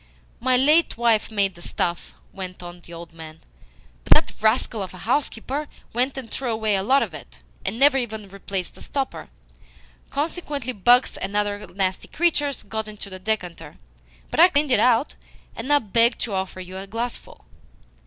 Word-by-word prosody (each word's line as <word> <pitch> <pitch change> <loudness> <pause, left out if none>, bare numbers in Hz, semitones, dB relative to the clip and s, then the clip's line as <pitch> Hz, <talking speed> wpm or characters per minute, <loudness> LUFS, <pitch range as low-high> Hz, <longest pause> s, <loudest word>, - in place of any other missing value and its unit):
"My 255 +1 +3
late 300 +4 +4
wife 230 -2 +3
made 200 -3 +1
the 175 - -15
stuff," 175 0 -3 0.2
went 185 -2 -7
on 175 0 -9
the 170 - -15
old 170 0 -9
man, 160 -1 -10 0.6
"but - - +7
that - - +1
rascal 220 0 +2
of 190 - -6
a - - -10
housekeeper 275 +3 -1 0.3
went 255 +4 0
and 255 -4 -6
threw 260 -2 -2
away 220 -2 +1
a 190 - +1
lot 265 +8 +4
of - - -6
it, - - -10 0.3
and 195 +4 -2
never 270 +1 +5
even 220 -4 -4
replaced 195 -1 -4
the - - -16
stopper. 275 -2 -4 0.8
Consequently 290 -4 -2
bugs 245 +5 +4
and 195 +1 -4
other 205 0 -1
nasty 185 0 -2
creatures 295 -5 0
got 220 -1 -4
into 210 -2 -8
the 185 - -6
decanter, 185 - -3 0.5
but - - -2
I 345 - +10
cleaned 290 -3 +2
it 230 - +5
out, 245 +4 +3 0.4
and 230 - -6
now 290 0 +5
beg 230 +1 +3
to 220 - -2
offer 190 -1 -3
you 185 0 -7
a 195 +1 -7
glassful." 230 +4 -5
220 Hz, 180 wpm, -24 LUFS, 190-260 Hz, 0.8 s, I